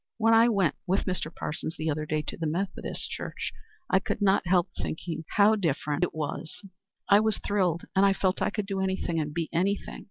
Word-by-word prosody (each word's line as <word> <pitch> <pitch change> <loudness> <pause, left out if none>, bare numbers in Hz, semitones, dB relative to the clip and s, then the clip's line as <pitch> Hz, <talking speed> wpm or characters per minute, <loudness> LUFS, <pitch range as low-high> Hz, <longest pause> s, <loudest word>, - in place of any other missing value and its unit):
When 225 0 +4
I 225 +1 +6
went 195 -8 +2
with 190 +2 +1
Mr. 180 -4 -2
Parsons 160 0 -4
the 155 - -3
other 155 +1 -3
day 155 0 0
to - - -5
the 165 - -2
Methodist 185 +6 -3
church, - - -4 0.4
I 190 - +4
could - - -3
not 195 -3 +3
help 175 -1 +3
thinking 160 0 -4
how 210 +2 +6
different 155 -4 0
it 180 - -1
was. 155 +4 -5 0.4
I 200 - +7
was 220 -1 +2
thrilled 180 -5 0
and 190 - +5
I 200 -1 +5
felt 190 -1 0
I - - +2
could 210 -1 -3
do 195 -1 -3
anything 190 -3 -1
and 150 -1 -2
be 165 +1 -2
anything. 195 +4 -1
185 Hz, 210 wpm, -28 LUFS, 160-200 Hz, 0.4 s, I